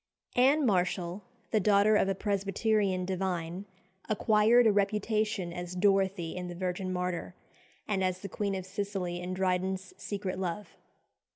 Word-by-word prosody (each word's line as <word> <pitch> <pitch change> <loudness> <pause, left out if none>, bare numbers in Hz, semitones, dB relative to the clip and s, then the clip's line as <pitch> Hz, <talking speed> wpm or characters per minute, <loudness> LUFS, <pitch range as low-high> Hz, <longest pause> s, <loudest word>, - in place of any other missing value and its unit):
Anne 275 +4 +4
Marshall, 185 -2 0 0.3
the 220 - +3
daughter 205 +1 +4
of 195 - +3
a 195 - 0
Presbyterian 200 -1 0
divine, 180 -1 -3 0.4
acquired 220 +3 +4
a 220 - +6
reputation 210 -2 0
as 175 0 -6
Dorothea 195 -3 +1
in 180 - -5
"The 175 - -6
Virgin 185 +1 -3
Martyr," 180 0 -3 0.5
and 195 -3 0
as 185 0 -1
the 200 - -5
Queen 200 +1 -2
of 190 -1 -4
Sicily 190 -2 -3
in 180 +1 -4
Dryden's 185 0 -1
"Secret 190 -2 -4
Love." 190 +2 -3
190 Hz, 145 wpm, -30 LUFS, 180-205 Hz, 0.5 s, a